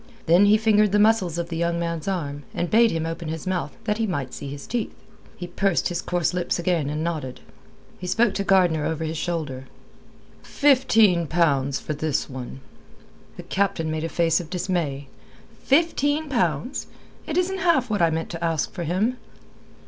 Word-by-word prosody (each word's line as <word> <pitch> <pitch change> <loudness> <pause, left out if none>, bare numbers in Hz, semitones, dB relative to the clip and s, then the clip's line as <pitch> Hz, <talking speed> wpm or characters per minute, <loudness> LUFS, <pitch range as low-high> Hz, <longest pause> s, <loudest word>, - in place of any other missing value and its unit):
Then 175 +5 +5
he 210 +1 +6
fingered 210 -2 +3
the - - +5
muscles 205 -6 +3
of 170 0 -3
the 165 - -4
young 170 0 0
man's 170 -1 -3
arm, 145 -7 -3
and 175 - -2
bade 230 +1 +5
him 165 -4 -2
open 165 0 -5
his 160 -1 -5
mouth 180 -6 -3
that 210 0 -1
he 225 - +1
might 140 -9 -3
see - - -6
his 140 0 -8
teeth. 240 -3 -3 0.4
He 175 - -5
pursed 185 +1 0
his 175 0 -2
coarse 175 -3 -1
lips 180 -1 -1
again 170 -4 0
and 150 +1 -2
nodded. 155 -7 -4 0.6
He 180 - -6
spoke 225 +2 +2
to 200 - -1
Gardner 180 -6 +3
over 160 +1 -2
his 160 0 -3
shoulder. 150 -7 -3 0.8
"Fifteen 225 - +3
pounds 140 -5 +1
for 155 - -4
this 150 -1 -1
one." 130 0 -8 0.8
The - - -7
Captain 185 -5 -1
made 155 0 -2
a 165 - -2
face 165 -1 +2
of 170 -3 -8
dismay. 170 -6 -2 0.6
"Fifteen 295 0 +2
pounds! 180 - -1 0.4
It 320 - -2
isn't 380 +1 0
half 315 - +2
what 205 - 0
I 170 - +5
meant 160 0 -3
to 170 -1 -6
ask 165 -3 0
for 175 -3 -5
him." 205 +10 0
170 Hz, 185 wpm, -24 LUFS, 160-210 Hz, 0.8 s, he